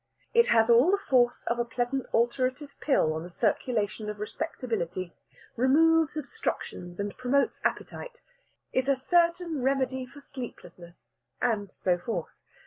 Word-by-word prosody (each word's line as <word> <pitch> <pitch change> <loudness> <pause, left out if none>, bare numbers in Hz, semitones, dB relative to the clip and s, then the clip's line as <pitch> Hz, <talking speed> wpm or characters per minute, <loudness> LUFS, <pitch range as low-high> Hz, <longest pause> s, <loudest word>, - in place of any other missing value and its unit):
It 470 0 +5
has 225 -1 +4
all 240 +7 +6
the 400 - +4
force 250 -10 +2
of 235 +1 -1
a - - +3
pleasant 245 +3 -2
alterative 255 +4 0
pill 160 - +2
on 160 - -3
the 175 - -8
circulation 215 +1 -1
of 210 -1 -6
Respectability 210 - -3 0.4
removes 310 +5 +4
obstructions 205 - -4
and 205 0 -3
promotes 255 +2 +1
appetite - - -3 0.5
is 260 +1 +1
a 275 - +5
certain 335 +1 +1
remedy 260 -1 0
for 285 - -13
sleeplessness, 235 -10 -10 0.3
and 215 -5 0
so 180 -1 0
forth. 225 +6 -4
250 Hz, 135 wpm, -28 LUFS, 215-280 Hz, 0.5 s, all